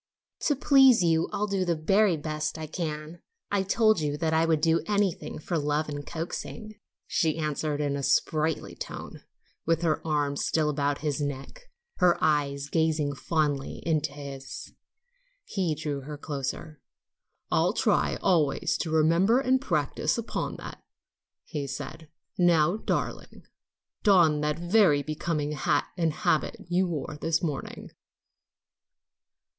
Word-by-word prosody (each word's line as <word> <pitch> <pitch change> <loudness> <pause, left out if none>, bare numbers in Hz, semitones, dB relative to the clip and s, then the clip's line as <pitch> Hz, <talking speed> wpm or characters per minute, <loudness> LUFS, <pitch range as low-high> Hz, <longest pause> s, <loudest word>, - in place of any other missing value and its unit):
"To 290 - +3
please 270 -5 +6
you 165 -1 +2
I'll 210 - -1
do 195 -2 0
the 175 -2 +1
very 195 +3 +3
best 155 0 -3
I 160 - -5
can. 155 0 -5 0.3
I 200 -1 +2
told 215 +1 +3
you 150 -1 -1
I 160 0 +2
would 160 -2 +3
do 165 +2 +2
anything 205 -3 0
for 165 +2 -2
love 150 +1 -1
and 145 -1 -5
coaxing," 210 +6 -6 0.3
she 160 -1 0
answered 150 -1 -2
in 145 -1 0
a 140 - -3
sprightly 155 +3 0
tone, - - -8 0.4
with 165 +1 +1
her 160 -2 +1
arm 145 -3 0
still 155 0 +1
about 145 -1 -1
his 150 0 -1
neck, 145 - -6 0.3
her 180 -2 +4
eyes 140 -2 +1
gazing 155 -2 +1
fondly 145 -2 -1
into 155 -3 +1
his. 140 -2 -8 0.7
He 180 -6 -1
drew 145 -2 -3
her 145 +2 -7
closer. 145 +1 -5 0.7
"I'll - - +3
try - - +2
always 160 -7 +2
to 165 - -2
remember 165 +9 +4
and 260 -1 +2
practice 155 - 0
upon 235 - -3
that," - - -9 0.7
he 145 -2 -2
said, 150 +3 -7 0.3
"Now, 175 0 +4
darling, - - -3 0.6
don 170 -8 +4
that 150 0 0
very 175 -4 +3
becoming 155 0 -2
hat 145 0 +1
and 165 -3 +1
habit 155 0 0
you 180 +1 +2
wore 150 -3 -4
this 165 +1 0
morning." 150 -5 -4
155 Hz, 140 wpm, -27 LUFS, 150-175 Hz, 0.7 s, please